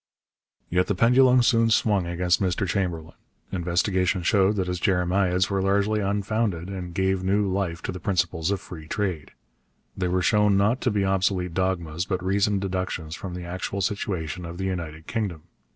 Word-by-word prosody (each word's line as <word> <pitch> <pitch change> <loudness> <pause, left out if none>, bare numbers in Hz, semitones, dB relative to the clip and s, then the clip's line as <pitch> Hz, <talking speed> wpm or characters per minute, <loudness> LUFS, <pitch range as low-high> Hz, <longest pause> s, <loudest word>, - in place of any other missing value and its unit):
Yet 90 +1 +1
the 100 - 0
pendulum 125 +4 +5
soon 115 -1 +3
swung 105 -5 +2
against 90 +1 +1
Mr 95 +1 0
Chamberlain. 85 -5 -2 0.4
Investigation 90 +1 0
showed 100 +1 +3
that 95 -2 0
his 90 0 -3
jeremiads 90 0 +1
were 100 -1 +1
largely 100 +2 +1
unfounded, 100 -2 -1
and 90 -2 -5
gave 95 0 +1
new 100 +2 +2
life 95 -3 -2
to - - -3
the 90 - -7
principles 90 -2 0
of 100 -1 0
free 80 -3 -10
trade. 90 -6 -2 0.7
They 90 - -1
were 90 +1 0
shown 105 0 +3
not 105 +6 +2
to 125 - +1
be 105 -3 0
obsolete 95 -2 0
dogmas, 90 -2 -1
but 95 -2 -2
reasoned 100 +1 +1
deductions 90 -4 -3
from 90 -1 -7
the 90 - -6
actual 95 +3 -4
situation 90 -3 -2
of 85 0 -7
the 95 - -3
United 80 -4 -4
Kingdom. 100 -9 -3
95 Hz, 170 wpm, -25 LUFS, 90-100 Hz, 0.7 s, pendulum